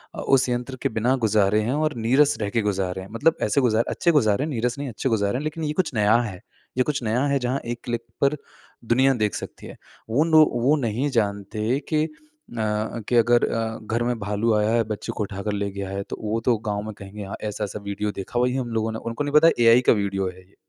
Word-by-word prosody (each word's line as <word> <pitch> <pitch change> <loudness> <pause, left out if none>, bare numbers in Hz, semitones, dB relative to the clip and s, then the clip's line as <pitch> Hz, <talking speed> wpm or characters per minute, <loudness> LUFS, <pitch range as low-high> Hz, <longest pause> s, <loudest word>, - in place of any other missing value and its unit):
अ, - - -6
उस 135 -1 +3
यंत्र 125 +2 -2
के - - +1
बिना 115 +4 +1
गुजारे 105 0 +3
हैं 115 +5 -1
और 155 -2 0
नीरस 140 +4 +4
रह 100 - -1
के 115 - 0
गुजारे 95 -2 -1
हैं, 95 - -9
मतलब 135 +9 +2
ऐसे 105 +7 +2
गुजारे 115 -2 +2
अच्छे 170 - +2
गुजारे 125 -5 +3
हैं, 155 - -3
नीरस 125 +1 -1
नहीं 140 -2 -3
अच्छे 125 +3 -2
गुजारे 105 +1 +1
हैं 145 - -4
लेकिन 155 +1 -4
ये 150 0 -1
कुछ 170 -5 -1
नया 105 0 +3
है। 95 -6 -6 0.4
ये 130 - +4
कुछ 140 -3 -2
नया 115 +5 +1
है 140 -1 +1
जहाँ 125 +2 -1
एक 120 0 -4
क्लिक 120 -1 -3 0.2
पर 140 +2 +3 0.5
दुनिया 130 +4 +4
देख 105 -4 0
सकती - - -8
है। - - -10 0.3
वो 140 +8 +3
नो 160 -1 +6
वो 125 +5 +3
नहीं 120 +5 -1
जानते 105 +2 -1
कि 155 -1 +2
अ, 160 - -1 1.0
कि 120 - +1
अगर 120 +1 +4
अ, 115 -1 -2
घर 115 +2 -1
में 120 0 -1
भालू 105 +3 0
आया 105 0 +2
है, 115 0 +3
बच्चे 110 -1 -5
को 105 - 0
उठाकर 100 +1 -4
ले 100 0 -2
गया 100 -1 -5
है 100 0 -3
तो - - -5
वो 110 +1 -1
तो 120 -3 +3
गाँव 105 -1 -1
में 110 0 -6
कहेंगे 100 +1 -8
हाँ 95 - -6
ऐसा-ऐसा 105 0 -4
वीडियो 100 +1 -3
देखा 100 +5 -4
वही 125 +1 +1
हम 130 -3 -2
लोगों 110 0 0
ने 110 - -5
उनको 115 +6 -3
नहीं 145 - -3
पता 155 +2 +7
एआई 115 +2 +7
का - - +8
वीडियो 95 -1 -1
है 90 - -12
ये, 100 - -29
115 Hz, 245 wpm, -24 LUFS, 105-130 Hz, 1.0 s, का